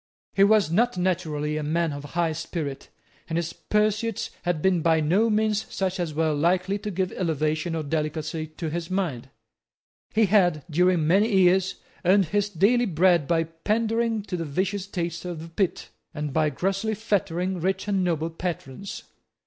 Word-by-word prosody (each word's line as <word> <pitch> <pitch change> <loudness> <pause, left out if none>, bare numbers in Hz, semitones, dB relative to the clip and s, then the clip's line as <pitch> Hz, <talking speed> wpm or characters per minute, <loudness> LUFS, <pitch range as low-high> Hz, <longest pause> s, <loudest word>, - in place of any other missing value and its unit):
He 195 - +4
was 205 -5 +4
not 235 +3 +2
naturally 155 -4 -1
a - - -2
man 160 +1 0
of 145 0 -6
high 165 +3 -1
spirit; 155 -3 -5 0.4
and 165 - -1
his 170 0 -2
pursuits 215 +1 0
had 175 -3 -1
been 180 +1 +2
by 160 0 +3
no 185 +9 +2
means 215 0 +1
such 190 0 -2
as 170 -3 -1
were 160 -1 +1
likely 180 +6 +1
to 210 - -4
give 190 -1 -1
elevation 155 -1 -1
or 160 - -2
delicacy 155 +1 -2
to 155 0 -5
his 170 +1 -4
mind. 165 -10 -2 0.8
He 220 +1 +3
had, 180 -7 +3
during 180 0 +3
many 200 +8 +3
years, 190 0 +4 0.3
earned 190 +2 +4
his 205 +1 +1
daily 215 +7 +3
bread 170 -3 +3
by 165 -1 +2
pandaring 220 +6 -1
to 200 -2 -4
the 170 - -2
vicious 190 +6 -2
taste 170 -3 -3
of 175 -3 -5
the 165 +1 -8
pit, 185 +2 -1 0.3
and 150 -2 -3
by 155 0 +2
grossly 195 +8 -1
flattering 190 -3 -1
rich 190 +3 -1
and 195 -2 +1
noble 165 -2 -1
patrons. 170 0 -5
175 Hz, 170 wpm, -25 LUFS, 160-195 Hz, 0.8 s, He